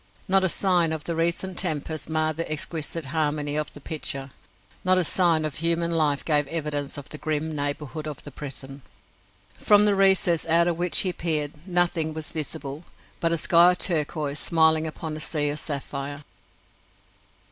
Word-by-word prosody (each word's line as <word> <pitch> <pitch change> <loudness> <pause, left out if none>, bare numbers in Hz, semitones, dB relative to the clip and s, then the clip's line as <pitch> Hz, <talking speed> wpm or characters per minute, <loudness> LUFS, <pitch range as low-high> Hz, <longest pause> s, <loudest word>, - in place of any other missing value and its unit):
Not 190 0 +3
a 185 - +2
sign 175 -3 +2
of 155 -2 -5
the 170 +1 -3
recent 170 +3 -1
tempest 160 -3 -2
marred 155 -1 0
the 165 -1 -3
exquisite 155 +1 -2
harmony 150 -2 0
of 150 0 -2
the - - -11
picture. 140 -2 -5 0.5
Not 185 0 +4
a 185 - +3
sign 165 -2 +2
of 155 - -4
human 170 +1 +1
life 150 -4 +1
gave 150 -3 +2
evidence 145 -3 -3
of 145 - -9
the 150 - -7
grim 155 0 -2
neighbourhood 145 +1 -4
of 150 - -7
the 145 - -10
prison. 135 0 -9 0.8
From 205 0 +6
the 205 - +4
recess 190 -4 +3
out 170 +1 +4
of 170 -1 -1
which 175 0 +3
he 185 -2 0
peered 155 -1 -1
nothing 175 -3 +1
was 160 -1 -5
visible 155 -1 -5 0.4
but 165 - +1
a 170 - +1
sky 175 +2 +5
of - - -6
turquoise 150 -4 0
smiling 160 -1 +3
upon 155 0 -6
a - - -6
sea 150 -1 0
of 145 +1 -3
sapphire. 145 0 -4
155 Hz, 175 wpm, -25 LUFS, 150-170 Hz, 0.8 s, From